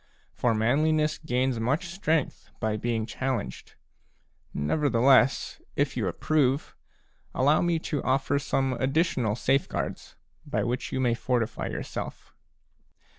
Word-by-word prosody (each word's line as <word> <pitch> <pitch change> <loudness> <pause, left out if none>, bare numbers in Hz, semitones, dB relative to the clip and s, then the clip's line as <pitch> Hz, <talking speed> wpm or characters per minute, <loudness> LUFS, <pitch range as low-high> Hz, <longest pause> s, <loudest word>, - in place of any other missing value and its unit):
For 115 -2 +1
manliness 150 +7 +2
gains 130 -4 0
much 135 +10 0
strength 165 -4 -1
by 110 -1 0
being 110 0 -1
challenged; 130 -1 -4 0.8
nevertheless, 130 - +3
if - - 0
you - - -1
approve, 145 -2 0 0.6
allow 145 +4 +4
me 175 -1 +2 0.2
to 145 - +1
offer 135 +2 +1
some 135 -2 0
additional 130 -5 +1
safeguards 135 +3 -1 0.3
by - - -1
which 125 +2 -2
you - - -1
may 125 -2 +2
fortify 120 -1 -1
yourself. - - -6
130 Hz, 115 wpm, -27 LUFS, 120-150 Hz, 0.8 s, allow